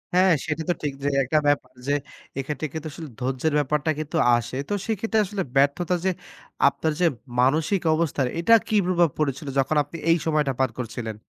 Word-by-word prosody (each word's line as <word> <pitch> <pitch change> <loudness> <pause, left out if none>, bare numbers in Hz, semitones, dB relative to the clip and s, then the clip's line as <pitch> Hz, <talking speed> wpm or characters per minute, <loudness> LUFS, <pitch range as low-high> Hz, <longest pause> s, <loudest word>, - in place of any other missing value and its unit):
হ্যাঁ 185 0 +5 0.2
সেটা 160 +1 -2
তো - - +4
ঠিক 145 -2 -1
যে, - - 0 0.2
একটা 155 +5 +1
ব্যাপার 140 -3 +1 0.2
যে - - +1 0.5
এক্ষেত্রে 150 +2 -3
কিন্তু 160 0 -5
আসলে 155 -1 -8
ধৈর্যের 130 +4 -1
ব্যাপারটা 150 +2 0
কিন্তু 155 +2 -3 0.2
আসে। 120 +2 -5
তো - - 0
সেক্ষেত্রে 220 0 0
আসলে 195 -1 -3
ব্যর্থতা 145 +6 +2
যে - - +4 0.6
আপনার 155 +3 0
যে, - - +5 0.4
মানসিক 155 +8 +2
অবস্থার 145 -5 0
এটা 230 +7 +4
কি 215 - 0
প্রভাব 175 -3 +3
পড়েছিল 145 0 -2
যখন 145 +3 +1
আপনি 155 +4 -10
এই 165 - +5
সময়টা 150 -3 +1
পার 130 -1 +3
করছিলেন? 115 -2 -5
155 Hz, 180 wpm, -24 LUFS, 135-170 Hz, 0.6 s, হ্যাঁ